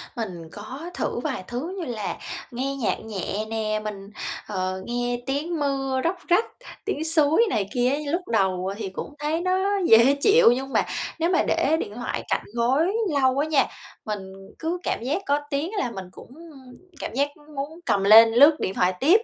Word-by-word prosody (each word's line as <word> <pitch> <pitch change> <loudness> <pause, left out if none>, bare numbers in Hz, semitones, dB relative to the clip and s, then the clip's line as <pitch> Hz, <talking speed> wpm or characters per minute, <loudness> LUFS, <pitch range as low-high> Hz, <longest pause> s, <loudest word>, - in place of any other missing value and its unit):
Mình 180 -8 -5
có 260 +11 -8
thử - - -2
vài 265 -11 -3
thứ 305 +11 -4
như 335 - -3
là 220 -5 -4 0.3
nghe 270 +3 -2
nhạc 255 - -1
nhẹ 215 0 -4
nè, 215 -1 -1
mình, 200 -2 -6 0.4
ờ, 185 -2 -2
nghe 245 0 -1
tiếng 300 +5 -2
mưa 270 -2 0
róc 345 +3 +1
rách, 355 +6 +4 0.4
tiếng 320 -7 -2
suối 320 +5 +4
này 205 -3 -1
kia 250 0 +2
á. 280 - +1
Lúc 360 +2 -2
đầu 190 -3 0
thì 205 -4 -4
cũng 240 +9 -7
thấy 310 +3 -1
nó 380 +2 +1
dễ 235 +5 +7
chịu, 420 - +6
nhưng 265 +2 -2
mà - - +3 0.3
nếu 335 +2 +2
mà 365 - +3
để 320 - +2
điện 205 - -5
thoại 245 - -4
cạnh - - 0
gối 270 - +2 0.3
lâu 260 +1 +3
á 305 - +1
nha, 300 -3 +3 0.4
mình 195 -3 -5 0.3
cứ 330 +2 -2
cảm - - -1
giác 300 +10 -1
có 285 +1 +2
tiếng 295 +6 -2
là 240 - -1
mình 190 -3 -7
cũng - - -13 0.7
cảm - - -5
giác 280 +3 +1 0.3
muốn 295 +5 -5
cầm 195 -1 +2
lên 225 +3 +9
lướt 290 +5 +7
điện 190 - -2
thoại 180 0 +2
tiếp. 365 +11 +5
260 Hz, 190 wpm, -24 LUFS, 215-315 Hz, 0.7 s, lên